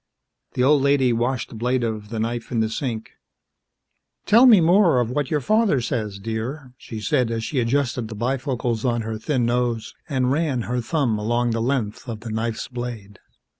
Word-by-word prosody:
The 125 Hz, -, +1 dB
old 145 Hz, +1 st, +5 dB
lady 135 Hz, -3 st, +3 dB
washed 120 Hz, +2 st, -1 dB
the -, -, -10 dB
blade 125 Hz, +2 st, 0 dB
of 110 Hz, -2 st, -3 dB
the 115 Hz, -1 st, -4 dB
knife 115 Hz, +1 st, -3 dB
in 120 Hz, -, 0 dB
the 110 Hz, 0 st, 0 dB
sink. 115 Hz, -3 st, -4 dB, 1.1 s
"Tell 235 Hz, +5 st, +7 dB
me 220 Hz, -6 st, +8 dB
more 170 Hz, -4 st, +4 dB
of 120 Hz, -1 st, 0 dB
what 145 Hz, 0 st, -1 dB
your 150 Hz, -2 st, 0 dB
father 215 Hz, -, +2 dB
says, 110 Hz, -5 st, -3 dB
dear," 115 Hz, +6 st, -5 dB
she 110 Hz, -, -7 dB
said 115 Hz, +2 st, +1 dB
as 115 Hz, -1 st, -2 dB
she 135 Hz, +3 st, -1 dB
adjusted 120 Hz, -1 st, 0 dB
the 110 Hz, -, -8 dB
bifocals 120 Hz, -1 st, -2 dB
on 120 Hz, -3 st, 0 dB
her 110 Hz, 0 st, -4 dB
thin 125 Hz, 0 st, 0 dB
nose 120 Hz, -1 st, -1 dB, 0.2 s
and 130 Hz, -3 st, +1 dB
ran 140 Hz, -5 st, 0 dB
her 125 Hz, +2 st, -2 dB
thumb 120 Hz, -5 st, 0 dB
along 120 Hz, +3 st, 0 dB
the 115 Hz, 0 st, -1 dB
length 120 Hz, -2 st, -2 dB
of 110 Hz, -2 st, -5 dB
the 115 Hz, -1 st, -6 dB
knife's 110 Hz, +1 st, -2 dB
blade. 120 Hz, -5 st, -7 dB
120 Hz, 190 wpm, -23 LUFS, 115-135 Hz, 1.1 s, me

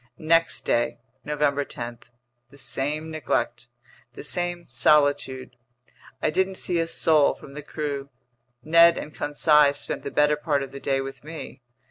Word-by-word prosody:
Next 165 Hz, +1 st, +2 dB
day, 120 Hz, 0 st, +1 dB, 0.3 s
November 145 Hz, -1 st, 0 dB
10: 120 Hz, -3 st, -7 dB, 0.5 s
the 140 Hz, -, -17 dB
same 150 Hz, +3 st, -2 dB
neglect, 120 Hz, -5 st, -2 dB, 0.5 s
the -, -, -9 dB
same 175 Hz, +2 st, -2 dB
solitude. 140 Hz, -1 st, +2 dB, 0.7 s
I 155 Hz, -, +2 dB
didn't 190 Hz, +3 st, 0 dB
see 175 Hz, -2 st, -1 dB
a 165 Hz, -, 0 dB
soul 160 Hz, -3 st, +3 dB
from 140 Hz, -, -13 dB
the 150 Hz, -, -7 dB
crew. 145 Hz, -2 st, -5 dB, 0.5 s
Ned 170 Hz, +2 st, +6 dB
and 150 Hz, -, -6 dB
Conseil 150 Hz, -1 st, +3 dB
spent 145 Hz, -, -3 dB
the -, -, -5 dB
better 150 Hz, +1 st, +2 dB
part 145 Hz, -2 st, 0 dB
of 135 Hz, -, -8 dB
the 140 Hz, -, -8 dB
day 135 Hz, -1 st, 0 dB
with 135 Hz, 0 st, -8 dB
me. 155 Hz, -3 st, -9 dB
150 Hz, 150 wpm, -25 LUFS, 135-160 Hz, 0.7 s, Ned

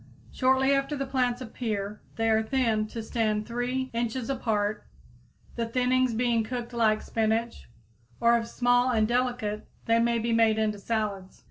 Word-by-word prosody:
Shortly 265 Hz, +1 st, +3 dB
after 275 Hz, +1 st, 0 dB
the 275 Hz, -, -2 dB
plants 255 Hz, -2 st, 0 dB
appear 215 Hz, -4 st, -4 dB
they 225 Hz, 0 st, 0 dB
are 220 Hz, 0 st, +4 dB
thinned 220 Hz, -3 st, 0 dB
to 225 Hz, 0 st, -6 dB
stand 215 Hz, -2 st, -1 dB
3 250 Hz, +2 st, -2 dB
inches 235 Hz, +2 st, -2 dB
apart, 215 Hz, -5 st, -1 dB, 0.7 s
the 230 Hz, -1 st, -2 dB
thinnings 255 Hz, 0 st, +1 dB
being 235 Hz, -2 st, +2 dB
cooked 240 Hz, +1 st, -5 dB
like 220 Hz, -2 st, +2 dB
spinach, 225 Hz, -, -1 dB, 0.5 s
or, 235 Hz, 0 st, +5 dB
if 230 Hz, -, -5 dB
small 245 Hz, +1 st, +2 dB
and 220 Hz, -3 st, +2 dB
delicate, 240 Hz, -3 st, -1 dB, 0.2 s
they 230 Hz, 0 st, +3 dB
may 235 Hz, 0 st, +2 dB
be 230 Hz, +1 st, -1 dB
made 225 Hz, -1 st, +4 dB
into 215 Hz, -1 st, 0 dB
salads. 200 Hz, -3 st, -3 dB
230 Hz, 155 wpm, -27 LUFS, 220-250 Hz, 0.7 s, or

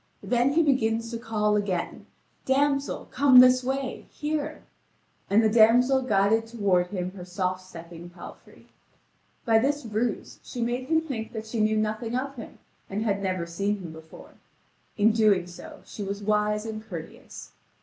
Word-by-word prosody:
Then 245 Hz, +3 st, +1 dB
he 330 Hz, +2 st, +4 dB
begins 230 Hz, -5 st, +1 dB
to 230 Hz, -, -4 dB
call 215 Hz, -2 st, 0 dB
again: 195 Hz, -4 st, -2 dB, 0.4 s
"Damsel, 275 Hz, +1 st, 0 dB
come 260 Hz, -1 st, +6 dB
this 255 Hz, 0 st, +6 dB
way, 265 Hz, 0 st, -3 dB
here!" 305 Hz, 0 st, -4 dB, 0.7 s
And 215 Hz, +3 st, +4 dB
the -, -, +5 dB
damsel 240 Hz, +4 st, +5 dB
guided 225 Hz, -1 st, +2 dB
toward 200 Hz, -6 st, +1 dB
him 180 Hz, -2 st, -4 dB
her 185 Hz, -2 st, -10 dB
soft 185 Hz, 0 st, -3 dB
stepping 170 Hz, -1 st, -11 dB
palfrey. 175 Hz, 0 st, -13 dB, 0.8 s
By 225 Hz, -2 st, +4 dB
this 285 Hz, +3 st, -1 dB
ruse 220 Hz, +1 st, -3 dB
she 245 Hz, -, -9 dB
made 240 Hz, +2 st, -2 dB
him 320 Hz, +1 st, +2 dB
think 250 Hz, -9 st, -6 dB
that 220 Hz, -1 st, -5 dB
she 220 Hz, +1 st, -4 dB
knew 215 Hz, 0 st, +2 dB
nothing 215 Hz, +2 st, -2 dB
of 270 Hz, +2 st, -2 dB
him 230 Hz, -, -10 dB, 0.3 s
and 205 Hz, +3 st, -2 dB
had 200 Hz, -3 st, 0 dB
never 185 Hz, -3 st, -2 dB
seen 200 Hz, +5 st, -2 dB
him 175 Hz, -4 st, -8 dB
before; 160 Hz, 0 st, -13 dB, 0.6 s
in 215 Hz, +1 st, +4 dB
so -, -, -3 dB
doing 210 Hz, -, 0 dB
she -, -, -9 dB
was 200 Hz, +1 st, -4 dB
wise 210 Hz, +1 st, 0 dB
and 215 Hz, -1 st, -6 dB
courteous. 170 Hz, -7 st, -10 dB
220 Hz, 160 wpm, -26 LUFS, 200-250 Hz, 0.8 s, come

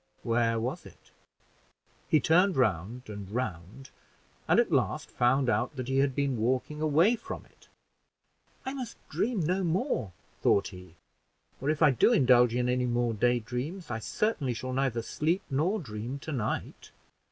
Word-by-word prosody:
Where 115 Hz, -1 st, +1 dB
was 120 Hz, +3 st, -3 dB
it? -, -, -19 dB, 1.0 s
He 155 Hz, -, +4 dB
turned 180 Hz, +6 st, +3 dB
round 110 Hz, 0 st, 0 dB
and 100 Hz, -2 st, -7 dB
round, 105 Hz, +1 st, -5 dB, 0.6 s
and -, -, +4 dB
at -, -, +2 dB
last -, -, 0 dB
found 130 Hz, +2 st, +2 dB
out 130 Hz, +4 st, 0 dB
that 130 Hz, -2 st, -5 dB
he 135 Hz, 0 st, +1 dB
had 135 Hz, -2 st, +2 dB
been 140 Hz, -3 st, 0 dB
walking 130 Hz, +6 st, -1 dB
away 160 Hz, +9 st, +4 dB
from -, -, -8 dB
it. -, -, -25 dB, 1.0 s
"I 265 Hz, -, -3 dB
must 255 Hz, -5 st, -6 dB
dream 225 Hz, -3 st, 0 dB
no 180 Hz, +4 st, 0 dB
more," 175 Hz, -, -1 dB, 0.3 s
thought 100 Hz, -, +3 dB
he, 90 Hz, -3 st, -13 dB, 0.7 s
"or 135 Hz, -, -1 dB
if 155 Hz, +1 st, +1 dB
I 150 Hz, -, +7 dB
do 130 Hz, -, +4 dB
indulge 125 Hz, -, +5 dB
in 125 Hz, 0 st, +1 dB
any 125 Hz, 0 st, +1 dB
more 120 Hz, -1 st, 0 dB
daydreams, 125 Hz, -, -1 dB
I 110 Hz, -, -2 dB
certainly 140 Hz, -, -1 dB
shall 130 Hz, +3 st, -4 dB
neither 130 Hz, -3 st, 0 dB
sleep 165 Hz, -, -1 dB
nor 170 Hz, +11 st, +1 dB
dream 120 Hz, -, -6 dB
to 155 Hz, -, -7 dB
night. 115 Hz, -7 st, -3 dB
130 Hz, 160 wpm, -29 LUFS, 115-155 Hz, 1.0 s, I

